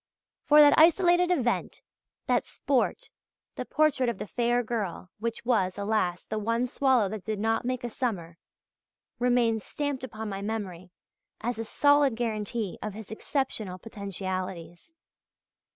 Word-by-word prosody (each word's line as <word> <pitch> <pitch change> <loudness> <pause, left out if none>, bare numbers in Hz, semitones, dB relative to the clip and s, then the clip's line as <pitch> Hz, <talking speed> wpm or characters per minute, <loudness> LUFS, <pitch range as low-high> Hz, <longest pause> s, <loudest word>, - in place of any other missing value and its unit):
For 300 0 +7
that 290 -1 +8
isolated 350 +2 +5
event, 255 -9 0 0.4
that - - +2
"sport," - - -1 0.4
the - - -4
portrait 295 -5 +2
of 235 - -3
the - - -5
"Fair 240 +2 +1
Girl," 205 -6 -4
which 230 +1 -4
was, 195 -7 +1
alas, 200 -4 0
the 215 - -3
one 230 +3 0
swallow 255 -4 +2
that 215 -1 -6
did 215 -1 -3
not 225 +2 0
make 255 0 -2
a 240 - -2
summer, 175 -10 -3 0.8
remains 240 -3 +2
stamped 285 -3 -3
upon 220 -3 -6
my 195 -1 -4
memory 195 -4 -4 0.5
as 235 0 -2
a - - -1
solid 285 +2 +3
guarantee 220 -3 -3
of 215 -2 -5
his 220 -1 -9
exceptional 220 -6 -3
potentialities. 185 - -5
225 Hz, 140 wpm, -28 LUFS, 200-255 Hz, 0.8 s, that